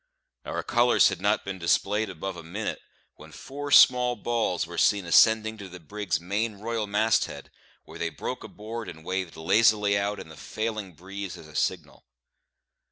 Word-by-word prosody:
Our - - -3
colours 120 0 +4
had 95 -2 -5
not 105 +2 +1
been 95 -1 -5
displayed 100 +5 +1
above 95 +1 -5
a 85 - -8
minute, 100 +7 -4 0.4
when - - -14
four 145 +1 -7
small 125 -3 +6
balls 115 -9 -1
were 85 +1 -5
seen 100 -3 +3
ascending 110 +4 +4
to 100 -2 -8
the 90 0 -10
brig's 100 +2 -3
main 105 +5 -2
royal 110 +1 -3
mast 110 +2 +2
head, - - -10 0.3
where - - -11
they - - -1
broke - - -6
abroad 110 +1 -7
and 80 -2 -10
waved 95 -2 -3
lazily 105 +4 +3
out 100 +1 -1
in - - -9
the 80 - -11
failing 110 -2 -4
breeze 95 +2 -7
as 80 -2 -12
a 75 - -15
signal. - - -3
100 Hz, 175 wpm, -26 LUFS, 90-110 Hz, 0.4 s, small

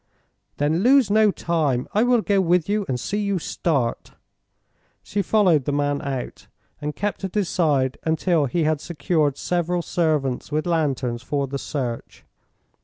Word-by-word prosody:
"Then 150 +3 +1
lose 250 0 +4
no 215 0 +5
time. 155 -9 0
I 210 - +3
will 245 -1 +3
go 200 -2 +2
with 175 -2 +2
you 205 0 0
and 125 -2 -1
see 205 +9 -2
you 200 -2 0
start." 140 -7 -2 0.9
She 205 - -2
followed 180 - +3
the - - 0
man 145 0 0
out, 135 -2 -5 0.3
and 150 0 -4
kept 205 -1 -3
at 190 0 -4
his 200 -5 +1
side 140 -7 +1
until 160 -1 +1
he 165 +6 0
had 155 -1 0
secured 155 -4 0
several 175 0 -1
servants 150 -8 -1
with 155 +1 -1
lanterns 140 -8 -1
for 140 +2 -1
the 135 +1 -5
search. 125 -6 -5
160 Hz, 160 wpm, -23 LUFS, 140-190 Hz, 0.9 s, no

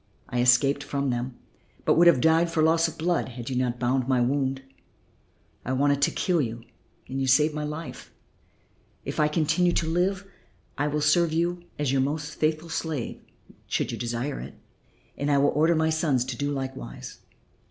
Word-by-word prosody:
I 125 -1 0
escaped 135 +3 +4
from 140 -1 -2
them, 120 +1 -4 0.5
but - - +4
would 175 +1 +5
have 150 -8 +5
died 165 +1 +4
from 160 -1 +2
loss 165 +1 +3
of 160 0 -8
blood 170 -1 0
had 120 +1 -7
you - - -2
not 125 -1 0
bound 125 +1 0
my 130 -2 +2
wound. 135 +1 0 1.0
I 130 - -2
wanted 140 +1 +2
to - - +4
kill 175 -4 0
you 115 -2 -4 0.4
and 135 +1 -3
you 135 - 0
saved 150 +4 +4
my 150 0 -3
life. 150 +2 -7 0.9
If - - -4
I 150 - +4
continue 160 +3 +1
to 165 - 0
live 185 +4 0 0.5
I 145 - 0
will 150 0 -1
serve 155 +2 +3
you 175 +1 -1
as 145 -3 0
your 135 -1 +2
most 145 +2 -2
faithful 155 +1 -1
slave 160 -6 -4 0.5
should - - -1
you - - -4
desire 120 +4 -3
it, - - -9 0.6
and 145 - -1
I 145 - +3
will 140 +1 +4
order 160 +3 +3
my 160 0 +2
sons 150 -6 +1
to 130 -1 -4
do 140 +4 -2
likewise. 130 - -6
145 Hz, 185 wpm, -26 LUFS, 130-160 Hz, 1.0 s, would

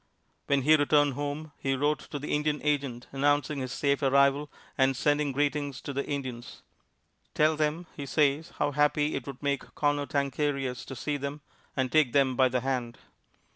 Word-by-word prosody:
When 140 -1 +2
he 155 +3 +6
returned 145 -1 +3
home, 145 +3 -4
he 135 0 0
wrote 145 +3 +1
to 145 - -4
the 145 +1 -4
Indian 150 0 0
agent, 140 -5 -1
announcing 145 +1 +1
his 130 -1 -4
safe 140 +1 0
arrival 140 +1 +3 0.2
and 135 -1 +2
sending 145 +1 +1
greetings 145 0 -1
to 140 - -5
the 140 +1 -1
Indians. 130 -4 -6 0.7
"Tell 155 +1 +4
them," 155 +3 -1
he 140 -2 -6
says, 145 +3 +1
"how 145 - +1
happy 150 +1 +2
it - - -4
would 135 0 -8
make 140 -1 -2
Conotancarius 140 -2 -1
to 130 - -7
see 145 +3 -2
them, 140 +1 -5 0.4
and 130 -1 0
take 155 -6 +3
them 135 -2 +3
by 130 0 +4
the 125 0 0
hand." 125 -2 -2
140 Hz, 175 wpm, -28 LUFS, 135-150 Hz, 0.7 s, he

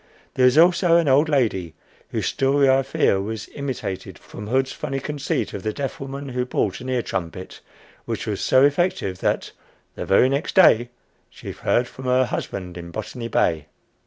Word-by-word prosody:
There 130 - +3
was 125 +3 +4
also 170 0 +5
an 170 -3 +2
old 140 +4 +4
lady, 100 - 0 0.3
whose - - -2
story 140 +1 +2
I 135 0 +4
fear 115 -7 +1
was 110 +1 -5
imitated 125 -9 -5
from 105 - -10
Hood's 130 +3 +1
funny 135 0 -4
conceit 140 -5 -3
of 100 - -5
the 110 +2 -2
deaf 140 +3 -4
woman 135 0 -6
who 125 -1 -1
bought 105 -5 -1
an 130 - -6
ear 125 -2 0
trumpet, 90 +2 -5 0.5
which - - -4
was - - -3
so 130 - +4
effective 145 - 0
that - - -1 0.4
"The - - -6
very 100 +6 +5
next 140 +3 -2
day 120 -10 +6 0.4
She - - -9
heard 120 +1 0
from 130 +1 -11
her 130 +1 +3
husband 90 -6 -5
in 85 0 -8
Botany 115 +5 -6
Bay!" 80 -8 0
130 Hz, 180 wpm, -22 LUFS, 105-140 Hz, 0.5 s, day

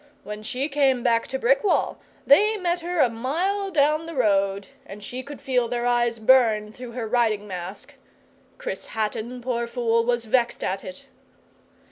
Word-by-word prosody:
When 210 0 -7
she 250 +5 -2
came 275 -4 +2
back 230 -2 +2
to 265 - -3
Brickwall, 270 - +1 0.3
they 425 +10 +5
met 355 -2 -1
her 350 0 -3
a - - +6
mile 340 - -1
down 305 -1 +2
the 330 - -7
road, 200 -4 +1
and 210 -6 -11
she 250 +5 -5
could 280 +2 -10
feel 250 -3 0
their 240 0 -2
eyes 240 -1 +1
burn 220 -3 +4
through 245 +1 -10
her 235 -2 -4
riding 220 -3 +1
mask. 185 +1 -7 0.6
Chris - - -5
Hatton, 225 +3 -3
poor 235 -2 -1
fool, 230 -1 +1
was 240 0 0
vexed 240 +1 +1
at 190 +1 -2
it. 185 0 -9
245 Hz, 165 wpm, -24 LUFS, 220-280 Hz, 0.6 s, a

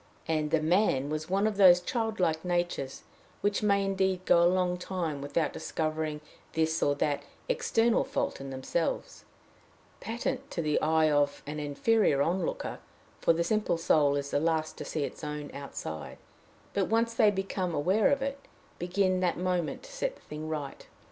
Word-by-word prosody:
And 155 -2 0
the 155 0 +1
man 155 -5 +2
was 155 +1 -3
one 195 +2 +2
of 215 -2 0
those 180 -3 +8
childlike 185 -6 -1
natures 175 -6 -2 0.4
which 205 0 +1
may 200 -1 +3
indeed 190 -1 0
go 170 - +5
a 170 - +6
long 180 -1 +1
time 170 -6 -3
without 150 +3 -1
discovering 155 -1 -2 0.3
this 160 0 +1
or 145 - +3
that 145 0 0 0.3
external 225 0 +2
fault - - -2
in 135 - -6
themselves, 135 +5 -3 0.7
patent 255 +4 -3
to 170 - -3
the 150 -1 +1
eye 155 0 +3
of 145 -1 +1
many 150 +1 -4
an 145 - -3
inferior 145 -2 +3
onlooker 175 +2 -2 0.4
for - - +4
the 165 +1 +1
simple 215 -1 +1
soul 150 -3 +3
is 140 0 -3
the - - +2
last 155 0 0
to - - -5
see 155 - -2
its - - -6
own 150 -1 -5
outside 135 - -6 0.6
but, 200 -2 +1
once 230 +1 +1
they 220 -2 +5
become 190 -3 -2
aware 190 +9 +3
of 280 -1 +1
it, 275 0 -3 0.4
begin 185 +1 +1
that 180 -2 +1
moment 180 - -1
to - - -12
set - - -2
the - - -21
thing 155 +1 -6
right. 150 -3 -5
170 Hz, 175 wpm, -29 LUFS, 150-195 Hz, 0.7 s, those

